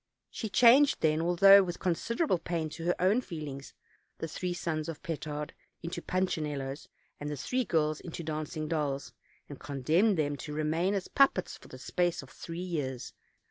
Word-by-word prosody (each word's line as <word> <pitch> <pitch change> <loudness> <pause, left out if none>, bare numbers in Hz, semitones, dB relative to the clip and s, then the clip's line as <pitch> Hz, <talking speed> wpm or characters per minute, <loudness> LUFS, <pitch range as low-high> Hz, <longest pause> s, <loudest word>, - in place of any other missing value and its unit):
She 220 - -4
changed, 250 +7 +6
then, 155 0 +2
although 195 +4 +7
with 180 -2 -3
considerable 190 - 0
pain 165 -2 -2
to 165 +2 -7
her 175 - +2
own 195 +7 +3
feelings, 150 - -7 0.4
the 165 - -4
three 180 +3 -3
sons 160 -2 -3
of 165 - -7
Petard 150 -2 -4 0.3
into 170 +1 -4
punchinellos, 150 -7 -2 0.3
and 145 - -4
the 150 - -4
three 255 - -1
girls 155 -2 +1
into 170 -1 -7
dancing 155 0 -4
dolls, 145 -4 -2 0.3
and 145 - -9
condemned 160 - +1
them 145 -2 0
to 150 +2 -7
remain 160 +6 0
as 195 - -2
puppets 275 -1 +2
for - - -15
the - - -10
space 175 -4 -1
of 130 - -14
three 165 0 -8
years. 150 -9 -4
165 Hz, 170 wpm, -30 LUFS, 150-180 Hz, 0.4 s, although